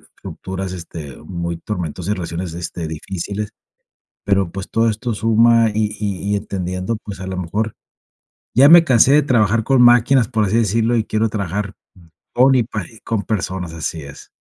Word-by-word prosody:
estructuras, 95 0 -6
este, 80 -5 -8
muy 85 +1 -5
tormentosas, 90 +1 -4
relaciones, 85 -1 -5
este, 85 -1 -5
difíciles, 95 +6 -5 0.7
pero, 100 -3 +1
pues, 95 +1 -7
todo 115 0 +2
esto 110 +2 -2
suma 115 +1 +4
y 105 0 -1
y 100 -1 -3
y - - +2
entendiendo, 95 +1 -3
pues, 100 -2 -8
a 95 - -6
lo 95 0 -4
mejor 100 +5 -2 0.8
ya 135 +4 +6
me 170 +1 +9
cansé 130 -3 +4
de 150 - +6
trabajar 115 -5 +2
con 130 +1 +3
máquinas, 120 0 +5
por 110 -1 0
así 105 +3 +1
decirlo, 115 +2 +1
y 110 - +1
quiero 110 +1 0
trabajar 100 -1 -3 0.6
con 130 +2 +5
y 125 - +3
pari 110 -1 -7
con 110 -3 -2
personas, 90 -5 -3
así 80 0 -4
es. 70 -1 -12
105 Hz, 165 wpm, -19 LUFS, 90-115 Hz, 0.8 s, me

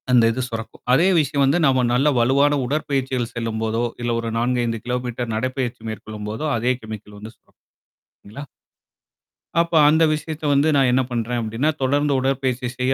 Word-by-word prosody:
அந்த 125 -2 +5
இது 125 +3 -3
சுரக்கும். 115 -1 -7
அதே 165 +8 +4
விஷயம் 140 -1 +1
வந்து 140 +5 +3
நம்ம 130 -2 +3
நல்ல 135 +4 +2
வலுவான 140 +4 +3
உடற்பயிற்சிகள் 135 -3 -2
செல்லும்போதோ, 115 0 -2 0.2
இல்ல 120 0 -1
ஒரு 115 0 -3
4 120 +1 0
5 115 -2 -3
கிலோமீட்டர் 125 -1 -3
நடைப்பயிற்சி 125 0 -3
மேற்கொள்ளும்போதோ, 110 +5 -5
அதே 125 +3 +1
கெமிக்கல் 105 -1 -9
வந்து 110 +2 -10
சுரக்கும். - - -36 0.7
இல்லங்களா? 125 +8 -9 1.2
அப்ப 170 0 0
அந்த 160 +2 +4
விஷயத்த 155 0 -5
வந்து 140 +2 +3
நான் 135 -2 +4
என்ன 130 +1 +3
பண்றேன்? 120 0 -2
அப்படின்னா, 115 +7 -1
தொடர்ந்து 145 +2 +1
உடற்பயிற்சி 130 -1 -1
செய்ய 130 +1 +1
125 Hz, 160 wpm, -21 LUFS, 115-140 Hz, 1.2 s, அந்த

